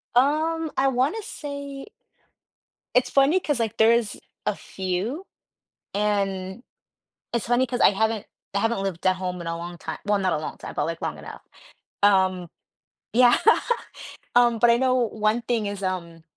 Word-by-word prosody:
Um, 315 Hz, +4 st, +2 dB
I 270 Hz, +1 st, +3 dB
wanna 270 Hz, -, +1 dB
say 280 Hz, -, -7 dB, 1.1 s
it's 250 Hz, 0 st, +3 dB
funny 280 Hz, +7 st, +4 dB
'cause, 295 Hz, -8 st, -1 dB
like, 225 Hz, -2 st, -2 dB
there's 225 Hz, -1 st, +3 dB, 0.3 s
a -, -, 0 dB
few, 195 Hz, -, -4 dB, 0.7 s
and 200 Hz, 0 st, -1 dB, 0.7 s
it's 235 Hz, -1 st, -1 dB
funny 245 Hz, +2 st, +2 dB
'cause 245 Hz, +1 st, -3 dB
I -, -, +7 dB
haven't 220 Hz, +1 st, -1 dB, 0.3 s
I -, -, +2 dB
haven't 225 Hz, -2 st, 0 dB
lived 190 Hz, -2 st, -3 dB
at 185 Hz, 0 st, +4 dB
home 180 Hz, -1 st, -4 dB
in 170 Hz, -, -7 dB
a 165 Hz, 0 st, -2 dB
long 175 Hz, 0 st, -7 dB
ti 160 Hz, -, -5 dB
well, 205 Hz, -1 st, +2 dB
not 190 Hz, -2 st, +1 dB
a -, -, +1 dB
long 155 Hz, -, -6 dB
time, -, -, -8 dB
but, -, -, 0 dB
like, 165 Hz, 0 st, -4 dB
long -, -, -3 dB
enough, -, -, -10 dB, 0.6 s
um 185 Hz, -3 st, +3 dB, 0.6 s
yeah, 245 Hz, 0 st, +6 dB, 1.0 s
um, 240 Hz, -2 st, +4 dB
but 240 Hz, -, +5 dB
I 235 Hz, -, +5 dB
know 255 Hz, 0 st, +2 dB
one 220 Hz, -1 st, +1 dB
thing 225 Hz, -2 st, 0 dB
is, 200 Hz, -1 st, -5 dB
um, 170 Hz, -3 st, -4 dB
220 Hz, 165 wpm, -24 LUFS, 190-255 Hz, 1.1 s, I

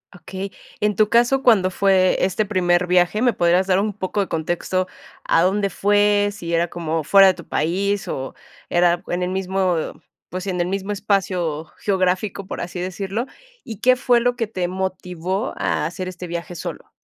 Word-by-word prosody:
Okey. 190 Hz, +3 st, -7 dB, 0.3 s
En 210 Hz, -1 st, +1 dB
tu 215 Hz, -1 st, +4 dB
caso, 240 Hz, +3 st, +3 dB
cuando 195 Hz, -6 st, +5 dB
fue 190 Hz, -1 st, +3 dB
este 190 Hz, +3 st, 0 dB
primer 180 Hz, -3 st, +1 dB
viaje, 180 Hz, +4 st, +2 dB
¿me 245 Hz, -1 st, +4 dB
podrías 175 Hz, +2 st, +2 dB
dar 185 Hz, 0 st, +3 dB
un 210 Hz, 0 st, -1 dB
poco 200 Hz, +1 st, -2 dB
de 195 Hz, -, -2 dB
contexto 175 Hz, +3 st, -1 dB, 0.4 s
a 165 Hz, -, +3 dB
dónde 200 Hz, +2 st, +1 dB
fue, 205 Hz, +1 st, +3 dB
si 175 Hz, -5 st, -7 dB
era 170 Hz, +1 st, +2 dB
como 165 Hz, -2 st, -3 dB
fuera 195 Hz, +4 st, +7 dB
de 185 Hz, -, +3 dB
tu 170 Hz, -, -11 dB
país, 195 Hz, +6 st, -1 dB
o 135 Hz, 0 st, -4 dB, 0.4 s
era 175 Hz, 0 st, +2 dB
en 175 Hz, +1 st, -2 dB
el 180 Hz, -, -1 dB
mismo, 190 Hz, -1 st, 0 dB, 0.5 s
pues 185 Hz, +2 st, -5 dB
sí, -, -, -3 dB
en 180 Hz, -1 st, -1 dB
el 175 Hz, -, 0 dB
mismo 195 Hz, +2 st, -3 dB
espacio 185 Hz, -6 st, -1 dB
geográfico, 190 Hz, 0 st, -1 dB
por -, -, -5 dB
así 175 Hz, +1 st, -5 dB
decirlo, 195 Hz, +6 st, -3 dB, 0.4 s
y 220 Hz, -4 st, -8 dB
qué 255 Hz, 0 st, +5 dB
fue 245 Hz, -1 st, +3 dB
lo 245 Hz, +1 st, +1 dB
que 230 Hz, -3 st, -2 dB
te 185 Hz, -5 st, -2 dB
motivó 185 Hz, +2 st, -3 dB
a -, -, 0 dB
hacer 180 Hz, +3 st, -4 dB
este 180 Hz, 0 st, -7 dB
viaje 170 Hz, +1 st, -5 dB
solo? -, -, -7 dB
185 Hz, 185 wpm, -21 LUFS, 175-205 Hz, 0.5 s, fuera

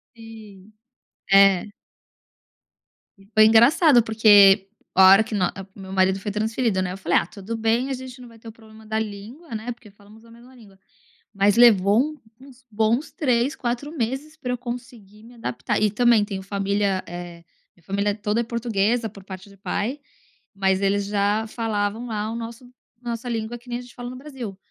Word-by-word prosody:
Sim, 215 Hz, -3 st, -14 dB, 0.6 s
é. 195 Hz, -2 st, +6 dB, 1.5 s
E, 195 Hz, -, -20 dB
foi 215 Hz, 0 st, +7 dB
engraçado 240 Hz, +5 st, +5 dB
porque 205 Hz, -3 st, +5 dB, 0.3 s
a 190 Hz, 0 st, +7 dB
hora 195 Hz, +3 st, +7 dB
que 220 Hz, -, -7 dB
nó 185 Hz, -4 st, +1 dB, 0.3 s
o -, -, -13 dB
meu 190 Hz, 0 st, -9 dB
marido 190 Hz, 0 st, +2 dB
foi 205 Hz, -, -4 dB
transferido, 220 Hz, 0 st, -1 dB
né? 180 Hz, -1 st, -3 dB
Eu -, -, -7 dB
falei: 175 Hz, -3 st, +2 dB
"Ah, -, -, -2 dB
tudo 205 Hz, +3 st, -7 dB
bem, 225 Hz, +4 st, 0 dB
a -, -, -1 dB
gente 255 Hz, 0 st, -9 dB
não 245 Hz, -, -11 dB
vai 230 Hz, -1 st, -17 dB
ter 225 Hz, -, -13 dB
o -, -, -9 dB
problema 220 Hz, -1 st, -17 dB
da 220 Hz, 0 st, -2 dB
língua, 220 Hz, +8 st, -7 dB
né? 225 Hz, +3 st, -4 dB
Porque 230 Hz, -3 st, -16 dB
falamos 210 Hz, +2 st, -19 dB
a 230 Hz, -, -18 dB
mesma 240 Hz, +3 st, -17 dB
língua," 205 Hz, -5 st, -18 dB, 0.6 s
mas 200 Hz, 0 st, +2 dB
levou 235 Hz, +6 st, +4 dB, 0.2 s
uns 260 Hz, -1 st, -17 dB
bons 225 Hz, +7 st, 0 dB
3, 255 Hz, 0 st, 0 dB
4 245 Hz, +5 st, -4 dB
meses 270 Hz, +7 st, -4 dB
pra 250 Hz, -5 st, -4 dB
eu 250 Hz, -, -3 dB
conseguir 235 Hz, -4 st, -9 dB
me 240 Hz, +1 st, -15 dB
adaptar, 230 Hz, -1 st, -3 dB
e 215 Hz, -, +3 dB
também 235 Hz, -1 st, +3 dB
tenho 195 Hz, -2 st, -6 dB
família 200 Hz, -1 st, -1 dB
eh, 175 Hz, -1 st, -9 dB, 0.3 s
minha 175 Hz, -, -27 dB
família 200 Hz, +3 st, -1 dB
toda 210 Hz, +2 st, -1 dB
é -, -, -2 dB
portuguesa 230 Hz, -1 st, -1 dB
por 200 Hz, -1 st, -14 dB
parte 190 Hz, +1 st, -10 dB
de 200 Hz, -, -18 dB
pai, 205 Hz, +8 st, -3 dB, 0.5 s
mas 190 Hz, -1 st, 0 dB
eles 200 Hz, 0 st, +1 dB
já 205 Hz, +2 st, 0 dB
falavam 215 Hz, 0 st, -3 dB
lá 215 Hz, -1 st, -3 dB
o 230 Hz, -, -5 dB
nosso 235 Hz, +2 st, -8 dB, 0.3 s
nossa 240 Hz, 0 st, -5 dB
língua 230 Hz, +1 st, -4 dB
que 245 Hz, +1 st, -18 dB
nem 240 Hz, -, -2 dB
a -, -, -8 dB
gente 245 Hz, -1 st, -15 dB
fala 245 Hz, 0 st, -7 dB
no 250 Hz, -, -8 dB
Brasil, 255 Hz, -8 st, -8 dB
220 Hz, 190 wpm, -23 LUFS, 200-240 Hz, 1.5 s, foi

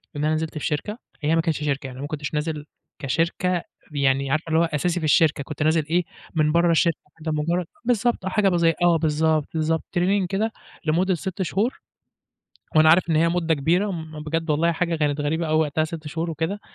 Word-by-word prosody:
إن 145 Hz, +1 st, -1 dB
أنا 155 Hz, -, +2 dB
نزلت 155 Hz, 0 st, -3 dB
في -, -, -4 dB
شركة، 205 Hz, +9 st, -2 dB, 0.2 s
هي 155 Hz, +2 st, +2 dB
ما 165 Hz, -, +3 dB
كانتش 160 Hz, -3 st, -1 dB
شركة، 140 Hz, -2 st, -1 dB
يعني 130 Hz, 0 st, -8 dB
ما 145 Hz, -, -4 dB
كنتش 150 Hz, -1 st, -5 dB
نازل 150 Hz, 0 st, -2 dB, 0.3 s
كشركة 170 Hz, +5 st, 0 dB, 0.3 s
يعني 135 Hz, -1 st, +1 dB
عارفة 155 Hz, +3 st, +1 dB
اللي 160 Hz, -, +3 dB
هو 170 Hz, -, +4 dB
أساسي 165 Hz, +3 st, -1 dB
في -, -, -7 dB
الشركة 150 Hz, 0 st, +3 dB
كنت 150 Hz, +1 st, -4 dB
نازل 155 Hz, -1 st, +2 dB
إيه، 175 Hz, +2 st, +2 dB, 0.3 s
من 150 Hz, -1 st, +3 dB
بَرّه 170 Hz, +1 st, +3 dB
الشركة 165 Hz, -1 st, +3 dB, 0.2 s
كده 160 Hz, 0 st, -3 dB
مجرّد 170 Hz, +4 st, 0 dB, 0.2 s
بالضبط، 240 Hz, -3 st, +1 dB
حاجة 200 Hz, 0 st, +2 dB
بزي 170 Hz, -2 st, +3 dB
آه، 175 Hz, -1 st, +5 dB
بالضبط، 155 Hz, -1 st, +1 dB
بالضبط، 160 Hz, 0 st, 0 dB, 0.2 s
training 190 Hz, +2 st, +2 dB
كده 215 Hz, +3 st, 0 dB, 0.3 s
لمُدّة 180 Hz, +5 st, +2 dB
6 190 Hz, +2 st, -5 dB
شهور، 210 Hz, +7 st, -1 dB, 1.0 s
وأنا 155 Hz, 0 st, +7 dB
عارف 170 Hz, +1 st, +4 dB
إن 155 Hz, -, +3 dB
هي 165 Hz, +2 st, +4 dB
مُدّة 165 Hz, -1 st, +1 dB
كبيرة، 175 Hz, +8 st, +1 dB
م 160 Hz, -3 st, -7 dB
بجد 165 Hz, +1 st, -2 dB
والله 165 Hz, +3 st, +2 dB
حاجة 170 Hz, 0 st, -1 dB
كانت 150 Hz, -1 st, 0 dB
غريبة 160 Hz, +3 st, -1 dB
أوي 155 Hz, +1 st, +3 dB
وقتها 155 Hz, 0 st, +1 dB
6 160 Hz, -1 st, -7 dB
شهور 165 Hz, +2 st, -3 dB
وكده، 165 Hz, +6 st, -3 dB
160 Hz, 205 wpm, -23 LUFS, 150-175 Hz, 1.0 s, وأنا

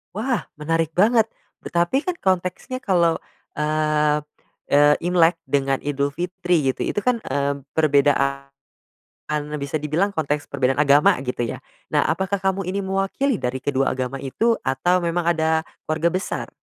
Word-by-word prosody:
Wah, 240 Hz, +3 st, -2 dB
menarik 165 Hz, +1 st, 0 dB
banget, 225 Hz, +3 st, +4 dB, 0.3 s
tetapi 175 Hz, +10 st, 0 dB
kan 360 Hz, +2 st, -3 dB
konteksnya 185 Hz, +7 st, -1 dB
kalau, 170 Hz, -6 st, +2 dB, 0.3 s
eee 150 Hz, 0 st, +1 dB, 0.6 s
eee, 145 Hz, +1 st, +6 dB
Imlek 175 Hz, -1 st, +4 dB
dengan 135 Hz, -2 st, +1 dB
Idul 140 Hz, -1 st, 0 dB
Fitri 175 Hz, 0 st, -1 dB
gitu, -, -, -8 dB
itu -, -, -5 dB
kan, 245 Hz, -3 st, +2 dB
mmm, 140 Hz, +1 st, -2 dB, 0.2 s
perbedaan 140 Hz, -2 st, +2 dB, 1.1 s
bisa 140 Hz, +2 st, -2 dB
dibilang 155 Hz, +7 st, 0 dB
konteks 150 Hz, -4 st, -2 dB
perbedaan 135 Hz, -1 st, +1 dB
agama 145 Hz, 0 st, +5 dB
gitu 125 Hz, -2 st, -2 dB
ya? -, -, -6 dB, 0.3 s
Nah -, -, +4 dB
apakah 190 Hz, 0 st, -1 dB
kamu 190 Hz, -1 st, 0 dB
ini 195 Hz, +2 st, -2 dB
mewakili 195 Hz, +7 st, 0 dB
dari 125 Hz, +1 st, -3 dB
kedua 135 Hz, -2 st, 0 dB
agama 130 Hz, +1 st, -3 dB
itu 225 Hz, -, 0 dB
atau 135 Hz, +8 st, +2 dB
memang 175 Hz, 0 st, -1 dB
ada 160 Hz, -1 st, +1 dB, 0.2 s
keluarga 160 Hz, +2 st, +1 dB
besar? 185 Hz, +3 st, -3 dB
160 Hz, 140 wpm, -22 LUFS, 140-190 Hz, 1.1 s, eee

